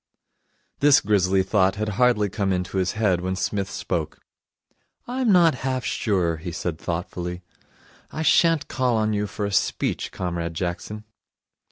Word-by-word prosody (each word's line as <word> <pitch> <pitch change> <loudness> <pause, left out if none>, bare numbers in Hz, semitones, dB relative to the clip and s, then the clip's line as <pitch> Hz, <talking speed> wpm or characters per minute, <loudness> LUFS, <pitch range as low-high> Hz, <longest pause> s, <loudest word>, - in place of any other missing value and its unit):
This 145 -1 +6
grisly 95 -2 +2
thought 95 0 +2
had 105 +1 -2
hardly 105 0 +2
come 100 0 -1
into 90 +1 -2
his 90 -1 0
head, 100 -5 +1
when 95 +1 -2
Psmith 100 +1 -2
spoke. 85 -4 -3 0.9
'I'm 250 -2 0
not 175 -4 +5
half 130 -1 -2
sure,' 90 -6 0
he 85 +2 -6
said 85 -1 -4
thoughtfully, 90 +1 -4 0.7
'I 160 - -4
sha'n't 165 -2 +3
call 125 -3 0
on 110 0 +1
you 105 0 -1
for 105 0 -4
a 100 - -3
speech, 100 - -1
Comrade 85 -2 -4
Jackson.' 90 +5 -4
100 Hz, 150 wpm, -24 LUFS, 90-110 Hz, 0.9 s, This